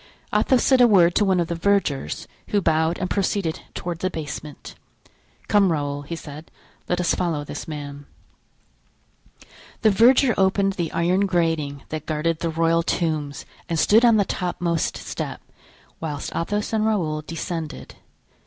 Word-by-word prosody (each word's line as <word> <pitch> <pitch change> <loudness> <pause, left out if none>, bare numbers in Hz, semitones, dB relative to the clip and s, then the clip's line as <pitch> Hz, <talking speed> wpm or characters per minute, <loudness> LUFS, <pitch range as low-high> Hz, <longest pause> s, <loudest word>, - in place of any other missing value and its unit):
Athos 260 -3 +3
said 260 -2 +4
a 245 - +8
word 180 -5 +5
to 210 - +3
one 190 -2 +2
of 170 - 0
the 170 - -2
vergers, 165 - 0 0.2
who 205 - +1
bowed 160 -1 +1
and 185 - -2
proceeded 195 -4 -1 0.2
toward 175 -2 -4
the 185 - 0
basement. 150 -3 -7 0.7
"Come, 200 -3 +4
Raoul," 145 -2 -2
he 145 +4 -6
said, 155 0 -10 0.4
"let 180 - +1
us 180 - +2
follow 165 -5 -1
this 145 - -7
man." 145 -2 -7 1.8
The 215 - +6
verger 245 +4 +5
opened 195 +1 +2
the 170 -4 -3
iron 185 +4 +1
grating 160 -6 -1
that 155 -1 -5
guarded 155 +1 -1
the 165 - -1
royal 165 +1 +2
tombs 155 -4 -2 0.2
and 165 - 0
stood 215 +8 +5
on 230 -2 +6
the 200 - +3
topmost 175 -3 -1
step, - - -5 0.6
whilst 150 -3 -5
Athos 205 +6 -2
and 220 -1 +2
Raoul 170 -9 0
descended. 165 0 -6
170 Hz, 155 wpm, -23 LUFS, 155-195 Hz, 1.8 s, a